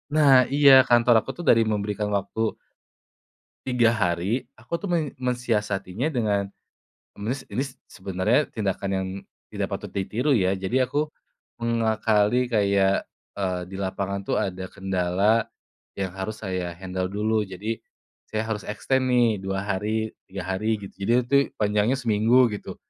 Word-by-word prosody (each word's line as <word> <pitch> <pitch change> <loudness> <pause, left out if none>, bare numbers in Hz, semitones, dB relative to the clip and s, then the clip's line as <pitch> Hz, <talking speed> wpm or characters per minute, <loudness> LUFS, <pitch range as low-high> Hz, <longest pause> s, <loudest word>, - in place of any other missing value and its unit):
Nah 150 -3 +6 0.2
iya 145 -1 +7 0.2
kantor 120 0 +5
aku - - -12
tuh 175 - -6
dari 115 - +6
memberikan 105 0 -2
waktu 100 +3 -4 1.3
3 120 -3 +3
hari 100 +3 0
aku 170 - -4
tuh 200 - -5
men 155 -5 0
mensiasatinya 110 -3 -1
dengan, 105 -6 0 0.7
nis 125 +6 -3
ini 130 - 0 0.2
sebenarnya 95 +9 0
tindakan 100 -2 -2
yang, 95 0 -1 0.4
tidak - - -3
patut - - -7
ditiru 105 +9 0
ya 95 -3 +2
jadi 120 +7 +1
aku, 150 +3 0 0.5
mengakali 115 0 +2
kayak, 100 -2 +2 0.3
eee, 95 -2 -1
di - - -6
lapangan 100 +1 -2
tuh - - +1
ada 95 0 -3
kendala, 95 +4 +1 0.5
yang 95 -2 -2
harus 100 +3 -5
saya 90 -3 -3
handle 95 0 -3
dulu 110 +2 +1
jadi, 105 +4 -4 0.5
saya 110 0 -2
harus 105 -3 -3
extend 130 +5 0
nih 120 -2 +4
2 100 +3 -2
hari, - - -45
3 95 -2 -6
hari 95 +4 -1
gitu 95 - -9
jadi 115 - +1
itu 140 +3 +3 0.2
panjangnya 105 +4 +2
seminggu 115 +1 +3
gitu, 105 - -6
105 Hz, 140 wpm, -25 LUFS, 95-120 Hz, 1.3 s, iya